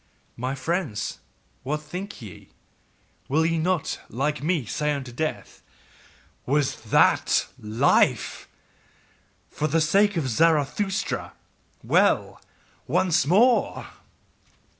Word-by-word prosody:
My 130 +3 -3
friends, 140 - -3 0.4
what 150 +3 -2
think 180 - -7
ye? 100 -5 -12 0.8
Will 155 +4 +2
ye 165 0 +1
not, 180 -1 -1
like 145 +5 -2
me, 155 -3 0
say 150 +7 -1
unto 135 -3 -5
death: 155 +6 -4 0.9
'Was 140 0 +1
THAT - - +3
life? 110 +2 +1 1.0
For 155 - -1
the 160 +2 +1
sake 200 +5 +3
of 150 -5 -1
Zarathustra, 165 - 0 0.5
well! - - +2 0.5
Once 175 -6 +2
more! 230 - +3
155 Hz, 95 wpm, -25 LUFS, 135-175 Hz, 1.0 s, THAT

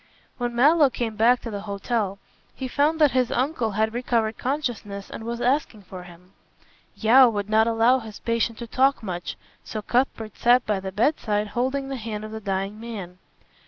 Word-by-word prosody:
When 240 -1 -2
Mallow 290 +4 +5
came 230 -3 -3
back 235 +4 +4
to 230 - -6
the 200 -1 -4
hotel 200 0 -2 0.4
he 260 - -4
found 295 +5 +1
that 300 -3 +5
his 255 -2 +1
uncle 250 -5 -1
had 220 +2 0
recovered 230 -2 0
consciousness 240 -8 -4
and - - -7
was 235 +1 -4
asking 245 -4 0
for 185 0 -9
him. 180 +1 -15 0.6
Yeo 245 +3 +6
would 205 -1 -3
not 220 +1 +4
allow 230 +3 +3
his 220 -3 -10
patient 230 -1 -1
to 235 - -6
talk 265 +2 +2
much, 175 -4 -5 0.3
so 215 -1 -6
Cuthbert 230 -3 -1
sat 245 +1 +4
by 210 -2 0
the 190 0 -6
bedside 210 -2 0
holding 260 +4 -1
the 270 - -3
hand 215 -2 -5
of 215 - -8
the 220 0 -6
dying 195 +1 -3
man. 200 -6 -8
225 Hz, 185 wpm, -24 LUFS, 210-250 Hz, 0.6 s, Yeo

